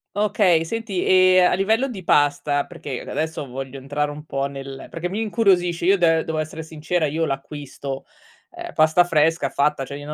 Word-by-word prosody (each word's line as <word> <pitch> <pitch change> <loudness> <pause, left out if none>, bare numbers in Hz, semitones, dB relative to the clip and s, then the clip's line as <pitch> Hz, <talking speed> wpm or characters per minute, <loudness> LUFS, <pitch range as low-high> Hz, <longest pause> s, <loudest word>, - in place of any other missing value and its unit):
Okay, 200 -5 +3
senti 210 +1 -3
e 185 0 +5
a 180 - +4
livello 220 +8 +1
di 200 -7 -7
pasta, 145 -2 +2
perché 150 -7 -7
adesso 160 -2 -4
voglio 135 +1 -7
entrare 145 +2 -2
un 150 +1 -10
po' 135 -3 -2
nel 135 -1 -7
perché 170 +2 -4
mi 200 +4 -3
incuriosisce 185 -6 +1
io 195 +2 +5
de 165 -2 +3
devo 160 -1 -4
essere 155 +1 -4
sincera, 160 +1 -2
io 160 +3 -1
l'acquisto, 140 -1 -6 0.5
ehm, - - -8
pasta 155 +3 +4
fresca 165 0 +2
fatta 145 -1 0
cioè 135 +1 -7
io 145 +1 -7
160 Hz, 180 wpm, -22 LUFS, 145-180 Hz, 0.5 s, e